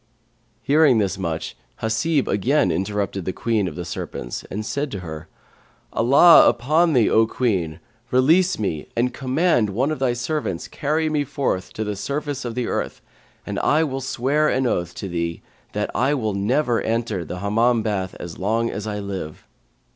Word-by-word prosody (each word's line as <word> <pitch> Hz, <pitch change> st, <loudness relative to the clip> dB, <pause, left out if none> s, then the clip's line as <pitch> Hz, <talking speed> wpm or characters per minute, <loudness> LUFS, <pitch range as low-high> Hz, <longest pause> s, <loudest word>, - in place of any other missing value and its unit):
'" 120 Hz, 0 st, -41 dB, 0.2 s
Hearing 145 Hz, -3 st, +4 dB
this 100 Hz, -2 st, 0 dB
much 85 Hz, -3 st, -3 dB, 0.3 s
Hasib 125 Hz, +7 st, +1 dB
again 135 Hz, +9 st, +2 dB
interrupted 100 Hz, -1 st, -2 dB
the 95 Hz, -, -2 dB
Queen 110 Hz, -3 st, 0 dB
of 80 Hz, -, -6 dB
the 90 Hz, -, -5 dB
Serpents 60 Hz, -8 st, -5 dB
and 105 Hz, +2 st, -4 dB
said 145 Hz, +4 st, -2 dB
to 100 Hz, -6 st, -5 dB
her, 80 Hz, -1 st, -8 dB, 0.7 s
"Allah 140 Hz, +8 st, +7 dB
upon 155 Hz, +7 st, +2 dB
thee, 120 Hz, -5 st, +4 dB
O 110 Hz, 0 st, +4 dB
Queen, 95 Hz, -11 st, -1 dB, 0.3 s
release 165 Hz, +10 st, +3 dB
me 90 Hz, -8 st, -3 dB
and 125 Hz, +2 st, +1 dB
command 135 Hz, -, +1 dB
one 130 Hz, +9 st, 0 dB
of 155 Hz, -, -3 dB
thy 130 Hz, -2 st, +1 dB
servants 125 Hz, -, -3 dB
carry 155 Hz, +2 st, -1 dB
me 150 Hz, -2 st, +1 dB
forth 130 Hz, -9 st, -2 dB
to 110 Hz, -, -3 dB
the 105 Hz, -1 st, -3 dB
surface 140 Hz, +4 st, -3 dB
of 115 Hz, -2 st, -4 dB
the 125 Hz, -1 st, -1 dB
earth, -, -, -3 dB, 0.4 s
and -, -, -3 dB
I 155 Hz, +2 st, +3 dB
will 135 Hz, -3 st, -3 dB
swear 140 Hz, +4 st, +1 dB
an 130 Hz, 0 st, +1 dB
oath 90 Hz, -7 st, -1 dB
to 100 Hz, -, -5 dB
thee 85 Hz, -2 st, -3 dB, 0.3 s
that -, -, -2 dB
I 145 Hz, +2 st, +2 dB
will 110 Hz, -6 st, -1 dB
never 120 Hz, +5 st, +1 dB
enter 115 Hz, -5 st, -1 dB
the 90 Hz, +3 st, -6 dB
Hammam 115 Hz, +4 st, +2 dB
bath 95 Hz, -4 st, -2 dB
as 85 Hz, -2 st, -8 dB
long 115 Hz, +4 st, 0 dB
as 105 Hz, 0 st, -5 dB
I 105 Hz, -1 st, -3 dB
live." 95 Hz, -6 st, -6 dB
115 Hz, 175 wpm, -22 LUFS, 100-140 Hz, 0.7 s, Allah